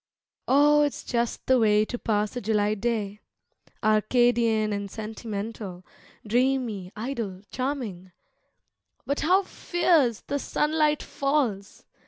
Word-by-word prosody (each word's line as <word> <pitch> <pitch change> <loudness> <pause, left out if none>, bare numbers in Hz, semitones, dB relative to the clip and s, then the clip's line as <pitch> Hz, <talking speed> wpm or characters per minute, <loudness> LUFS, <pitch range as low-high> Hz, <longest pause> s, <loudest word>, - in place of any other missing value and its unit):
Oh, 295 +2 +5
it's 290 -1 -1
just 235 -1 -2
the 260 -1 +4
way 215 -1 +4
to 245 +2 -5
pass 210 +1 -1
a 245 - -3
July 210 0 +1
day, 210 -2 -2 0.6
Arcadian 220 0 +2
and 200 0 -4
sentimental, 215 -3 -6 0.4
dreamy, 235 -5 0
idle, 215 -5 -4
charming, 245 -9 -4 0.9
But 280 - -1
how 370 +6 +3
fierce 335 - +1
the 285 - -3
sunlight 300 +1 +1
falls! 265 -9 -2
230 Hz, 110 wpm, -26 LUFS, 210-270 Hz, 0.9 s, Oh